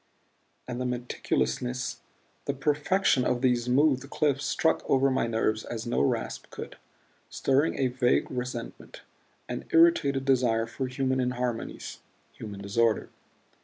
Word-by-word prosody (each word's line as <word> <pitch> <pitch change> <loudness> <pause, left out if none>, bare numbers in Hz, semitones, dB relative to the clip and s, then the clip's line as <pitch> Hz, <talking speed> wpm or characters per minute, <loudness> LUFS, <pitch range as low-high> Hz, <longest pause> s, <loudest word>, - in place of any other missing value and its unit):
And 125 0 -4
the - - -1
meticulousness, 125 - -2 0.5
the 140 - -1
perfection 150 +1 +2
of 125 0 0
these 125 -2 +2
smoothed 135 +1 +2
cliffs 145 -2 0
struck 160 - +1
over 135 0 +4
my 130 -2 +1
nerves 110 -1 0
as 115 0 -5
no 120 - 0
rasp 70 - -1
could, - - -8 0.5
stirring 140 +4 +1
a 135 - +1
vague 125 -1 +2
resentment, 125 -2 -6 0.4
an - - -5
irritated 155 -5 +4
desire 120 -4 +2
for 130 +3 -4
human 130 0 -1
inharmonies, 125 -2 -3 0.3
human 100 -3 -8
disorder. 110 +2 +1
125 Hz, 130 wpm, -28 LUFS, 120-135 Hz, 0.5 s, over